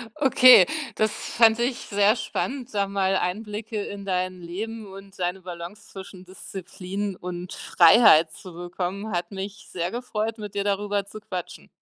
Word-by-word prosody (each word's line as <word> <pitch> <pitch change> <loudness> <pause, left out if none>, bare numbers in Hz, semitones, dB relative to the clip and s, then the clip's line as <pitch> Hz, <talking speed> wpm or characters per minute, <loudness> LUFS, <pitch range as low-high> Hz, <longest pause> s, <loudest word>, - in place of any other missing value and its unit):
Okay, 265 -4 +7 0.3
das 215 0 +1
fand 225 0 +3
ich 245 +1 0
sehr 205 +2 +2
spannend, 255 +2 -4
da 200 -1 +1
mal 195 -1 0
Einblicke 210 +3 -3
in 200 -1 -7
dein 185 -1 -2
Leben 215 +5 -6
und 195 0 -12
deine 180 +1 -2
Balance 180 +3 -9
zwischen 190 -1 -11
Disziplin 190 +1 -6
und 180 0 -7
Freiheit 165 -3 +6
zu 185 - -11
bekommen. 180 +4 -5
Hat 175 0 -2
mich 200 +2 -7
sehr 175 0 -3
gefreut, 225 -2 -3
mit 210 -1 -8
dir 200 - 0
darüber 205 0 -1
zu 205 +2 -10
quatschen. 185 -4 -7
200 Hz, 150 wpm, -25 LUFS, 180-215 Hz, 0.3 s, Okay